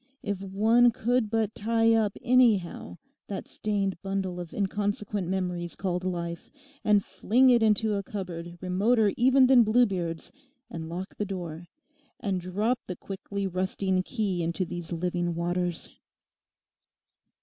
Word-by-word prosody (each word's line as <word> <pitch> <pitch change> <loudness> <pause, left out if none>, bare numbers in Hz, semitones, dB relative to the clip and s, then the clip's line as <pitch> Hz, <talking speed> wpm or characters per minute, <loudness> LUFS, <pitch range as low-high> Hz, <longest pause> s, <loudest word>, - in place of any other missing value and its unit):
If 200 -2 -3
one 220 +5 +4
could 240 0 0
but 220 -1 0
tie 225 +1 +2
up 215 -3 +1
anyhow 215 - +2 0.3
that 200 - -5
stained 200 -4 -2
bundle 195 -2 -3
of 175 -2 -7
inconsequent 205 -1 -2
memories 180 -2 -2
called 180 -2 -2
life, 170 -2 -4 0.3
and 210 -2 +3
fling 245 +7 +3
it 240 -1 +4
into 215 0 +2
a 200 - 0
cupboard 175 -4 -6
remoter 205 +4 +2
even 260 +2 +5
than 255 -1 +7
Bluebeard's, 195 -8 +1 0.4
and 160 -1 -6
lock 180 +3 -6
the - - -1
door, 175 -4 -6 0.5
and 195 -5 -2
drop 210 +8 0
the 180 - -4
quickly 200 +2 -5
rusting 190 0 0
key 195 -3 -2
into 170 +3 -1
these 175 0 -7
living 175 0 -1
waters! 175 0 -2
195 Hz, 135 wpm, -27 LUFS, 180-215 Hz, 0.5 s, than